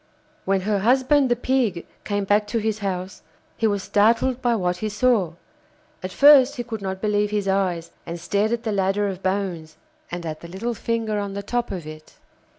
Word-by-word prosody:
When 195 -1 +1
her 205 +1 0
husband, 260 +5 +3
the 240 - +3
Pig, 240 -8 0 0.2
came 205 -1 -1
back 205 +1 +2
to 230 - -2
his 220 -1 -1
house, 190 -2 -4 0.3
he 225 - +1
was 200 -2 -1
startled 230 +5 +2
by 240 -1 +2
what 180 -4 -1
he 215 - -3
saw. 210 -5 +1 0.7
At 185 - -5
first 280 +2 +7
he 240 - -3
could 225 -3 -6
not 190 -1 -4
believe 210 -1 +1
his 205 -1 -1
eyes, 180 -4 0
and 170 +1 -6
stared 205 +5 0
at 235 0 -1
the 220 - -1
ladder 195 +1 +1
of 190 -1 -5
bones, 185 -5 -3 0.3
and 175 0 -5
at 155 -1 -5
the 170 - -10
little 200 +7 -3
finger 225 -2 -2
on 200 -1 -4
the 200 - -4
top 240 +3 -2
of 180 -5 -5
it. 155 0 -11
205 Hz, 200 wpm, -23 LUFS, 190-230 Hz, 0.7 s, first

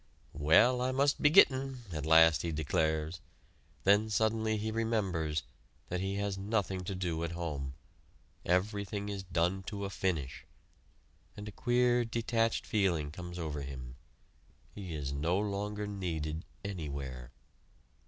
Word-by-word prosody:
"Well, 90 - +5
I 130 +1 +1
must 140 +2 +2
be 150 - +6
gittin'!" 135 -3 +5
at 75 -2 -4
last 80 -2 +7
he 85 - -2
declares; 80 +2 0 0.6
then 105 +3 +4
suddenly 110 0 +1
he 110 +1 -2
remembers 95 -9 0 0.5
that 90 - -1
he 95 +1 -2
has 100 -1 -2
nothing 95 -3 -1
to 95 - -3
do 85 -3 -2
at 85 0 -3
home 75 -6 -4 0.7
everything 100 +2 0
is 100 -1 -3
done 90 +1 0
to 100 -2 -4
a 100 - -5
finish 85 -9 -2 0.9
and 105 0 -7
a - - -5
queer, 120 +1 +2
detached 115 0 0
feeling 85 -8 +1
comes 90 +2 -7
over 75 -4 -3
him. 65 -3 -7 0.8
He 95 -5 -6
is 70 -2 -3
no 80 +6 +1
longer 105 0 -2
needed 85 -6 -3 0.2
anywhere. 70 -9 -5
95 Hz, 135 wpm, -32 LUFS, 80-105 Hz, 0.9 s, last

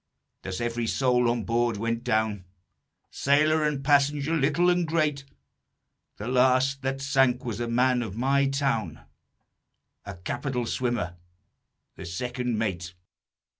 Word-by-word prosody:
Thus 95 -1 -5
every 120 0 -2
soul 125 -1 +2
on 120 -1 -1
board 115 +1 0
went 115 +2 -2
down, 110 -4 0 0.7
Sailor 155 +3 +2
and 145 -2 -1
passenger, 145 +2 +2
little 150 +4 +2
and 175 -1 0
great; 155 -4 0 0.9
The 105 - -6
last 130 +2 +2
that 135 0 -2
sank 135 -2 +2
was 115 -2 -4
a 120 - -2
man 125 +1 +2
of 110 -3 -6
my 135 +3 +2
town, 135 - -1 1.0
A 100 -1 -8
capital 125 - -3
swimmer, 120 -8 -2 0.8
the - - -8
second 125 +6 -3
mate." 90 -5 -3
125 Hz, 130 wpm, -26 LUFS, 115-140 Hz, 1.0 s, soul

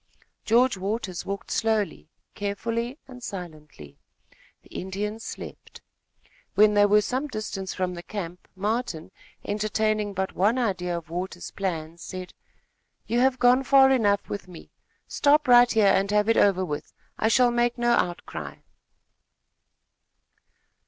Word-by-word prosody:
George 240 0 +3
Waters 195 -1 -4
walked 200 0 -5
slowly, 220 -3 -1 0.2
carefully, 230 +5 -3
and 250 -2 -12
silently. 155 - -9 0.6
The - - -21
Indians 210 +4 -4
slept. - - -9 0.8
When 210 0 +6
they 205 0 +5
were 210 +1 +5
some 260 +7 -2
distance 215 -6 -5
from 185 -1 -2
the 175 - -7
camp, 180 -2 -7
Martin, 205 -4 -3 0.3
entertaining 215 0 -1
but 190 0 -2
one 210 +7 +2
idea 180 -7 -1
of 165 -1 -10
Waters' 180 0 -5
plan, 170 -4 -4
said: 185 +1 -8 0.7
"You 235 +2 0
have 260 0 +3
gone 250 +1 +4
far 270 0 +6
enough 205 -6 +2
with 200 -2 -6
me. 180 -2 -13 0.4
Stop 295 0 +3
right 245 0 +7
here 220 -2 +3
and 195 +1 +1
have 210 0 +2
it 225 - +3
over 190 -2 +3
with. 150 -4 -5 0.3
I 220 - +2
shall 245 +2 +4
make 240 +1 +1
no 240 0 +2
outcry." 175 -7 -2
210 Hz, 135 wpm, -25 LUFS, 185-240 Hz, 0.8 s, right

